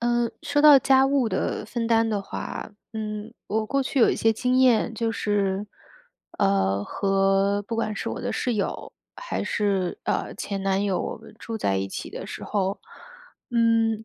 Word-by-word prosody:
嗯， 240 0 +1
说 290 +1 +1
到 295 -2 +9
家 265 0 +4
务 270 -4 +2
的 190 +2 -2
分 230 +1 -3
担 225 0 +3
的 205 -2 -1
话， 200 - -6 0.2
嗯， 215 0 -5 0.2
我 215 +1 0
过 275 +3 +1
去 270 - -2
有 230 - +6
一 - - 0
些 225 - +3
经 250 +3 +1
验。 235 -2 +3
就 230 0 -1
是， 205 -2 -1 0.7
呃， 95 +1 +2
和 195 +1 +1
不 230 - -3
管 215 -2 -1
是 - - -4
我 - - -4
的 - - -3
室 245 - -1
友， 205 - -3 0.2
还 - - -4
是， 195 -4 -1
呃， - - -1
前 195 -1 -4
男 195 0 +1
友， 195 -2 0
我 - - -4
们 220 0 -15
住 225 -1 -5
在 95 - 0
一 95 0 -2
起 - - -6
的 - - -7
时 - - -7
候， 195 -1 -1 0.7
嗯， 225 -2 +2
220 Hz, 195 characters per minute, -25 LUFS, 195-235 Hz, 0.7 s, 到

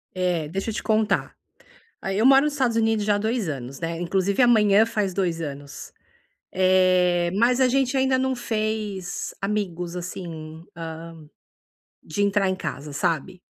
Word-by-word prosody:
Eh, 180 -4 0
deixa 195 +5 -3
eu - - -3
te - - -4
contar. 215 -1 +1 0.7
Aí 195 +1 -2
eu 220 - +2
moro 270 +1 +7
nos 300 - 0
Estados 255 -5 +1
Unidos 225 -2 +1
já 205 -1 +3
há - - +1
2 220 -1 -1
anos, 135 -2 -5
né? 165 0 -3
Inclusive, 190 +5 0
amanhã 215 -3 +5
faz 210 -5 -1
2 175 -4 -1
anos. 145 -2 -7 0.6
Eh, 185 -2 +3
mas 245 +5 +3
a 260 - +5
gente 270 +1 +1
ainda 265 0 +2
não 260 0 0
fez 215 -5 -3
amigos, 180 -4 -3
assim, 165 -3 -7
hã, 165 -1 -6 1.0
de 160 +6 -3
entrar 200 -1 +2
em 185 - 0
casa, 145 -4 -6
sabe? 175 +4 -1
195 Hz, 160 wpm, -24 LUFS, 170-220 Hz, 1.0 s, moro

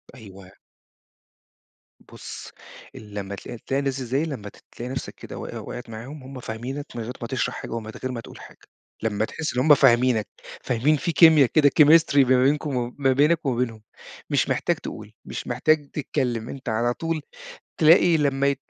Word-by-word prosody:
أيوه. 95 -5 -13 1.5
بُصّ، - - -10 0.4
لمّا 100 -2 -7
تل 110 +3 -9
تلاقي 135 - -2
الناس 135 -2 -1
اللي 125 - -5
زي 135 +4 +1
دي، 165 - -3
لمّا 105 -8 -6 0.2
تلاقي 125 +2 -7
نفْسك - - -5
كده - - -10
وقِع - - -6
وقَعت 120 -2 -8
معاهم، 130 +6 -9
هُم 130 0 -9
فاهمينك 125 +5 -5
من 120 - -4
غير 125 +3 -6
ما 115 - -4
تشرَح 130 0 -2
حاجة - - -7
ومن 110 -1 -5
غير 130 - -2
ما 120 -2 -5
تقول - - -13
حاجة. - - -13 0.5
لما 110 -1 0
تحس 155 +3 -4
إن 125 - -1
هُم 150 - +7
فاهمينك، 120 -4 +3 0.4
فاهمين 130 +6 +2
في 170 +4 -2
كيميا 160 -4 +7
كده 145 +3 +4
chemistry 155 0 +6
ما 130 -1 +5
بينكم 145 +1 +1
و 120 0 -3
ما 135 -2 +2
بينك 150 +3 +2
وما 130 -3 0
بينهم 115 -3 -2 0.5
مش - - +1
محتاج - - +1
تقول، - - -9
مش - - -6
محتاج 155 -2 +1
تتكلّم، 125 -6 -2
أنت 130 -3 -6
على 120 +2 +1
طول 165 +3 -3 0.6
تلاقي 165 +1 +6
لمّا 140 -2 +1
ي 140 - +2
130 Hz, 185 wpm, -24 LUFS, 115-145 Hz, 1.5 s, هُم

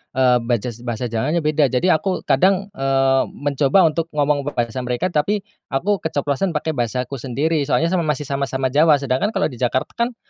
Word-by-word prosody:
eee, 125 -2 +4
bajas 120 0 -2
bahasa 120 0 -3
Jawanya 150 +9 0
beda. 150 -2 +2
Jadi 130 +9 +1
aku 185 +4 0
kadang, 195 +1 +2
eee, 135 0 +2
mencoba 145 +5 +2
untuk 165 +1 +1
ngomong 145 -1 +1
bahasa 120 +1 -2
mereka 125 +9 -1
tapi 195 +7 0 0.2
aku 195 +9 0
keceplosan 150 +2 -2
pakai 160 +1 -1
bahasaku 125 0 -3
sendiri. 145 +6 -1
Soalnya 165 +4 +1
sama 170 -4 0
masih 150 -1 -1
sama-sama 135 -2 -2
Jawa. 150 +1 +5
Sedangkan 140 +10 -1
kalau 190 -5 +1
di 125 - -11
Jakarta, 130 +1 -1
kan, 235 +1 0
145 Hz, 175 wpm, -20 LUFS, 130-165 Hz, 0.2 s, Jawa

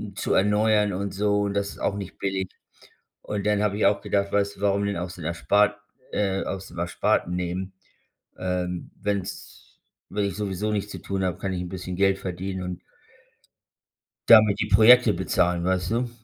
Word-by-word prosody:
zu 105 - -1
erneuern 105 +1 +3
und 100 +1 -3
so, 105 +1 +1
und 100 -1 -1
das 100 0 0
ist - - -13
auch 100 - -1
nicht 100 -2 -7
billig. 95 -1 -2 0.7
Und 105 -1 -4
dann 105 0 +2
habe 105 -1 0
ich 105 - +2
auch 100 - +1
gedacht, 100 -1 -1
weißt 100 0 0
du: - - -14
„Warum 100 0 +1
denn 100 -1 -2
aus 90 +1 -5
den 85 - -9
Erspart 100 +5 +2 0.4
äh, 95 -2 0
aus 95 -1 -5
dem 85 - -13
Ersparten 90 0 0
nehmen? 90 +2 -3 0.6
Ähm, 90 -1 -3
wenn's 100 -2 -3 0.6
wenn 105 +1 -1
ich 100 -3 -3
sowieso 105 0 -2
nichts 105 -1 -2
zu - - -7
tun 95 -1 -3
habe, 90 -1 -1
kann 95 -1 -3
ich 90 - -3
'n 90 - -5
bisschen 90 0 -5
Geld 95 0 +3
verdienen 95 +1 -4
und“ 90 -1 -5 1.5
„damit 110 -3 +7
die - - +1
Projekte 110 +2 +6
bezahlen.“ 90 -1 0
Weißt 90 +1 0
du? 120 +2 0
100 Hz, 185 wpm, -25 LUFS, 90-105 Hz, 1.5 s, damit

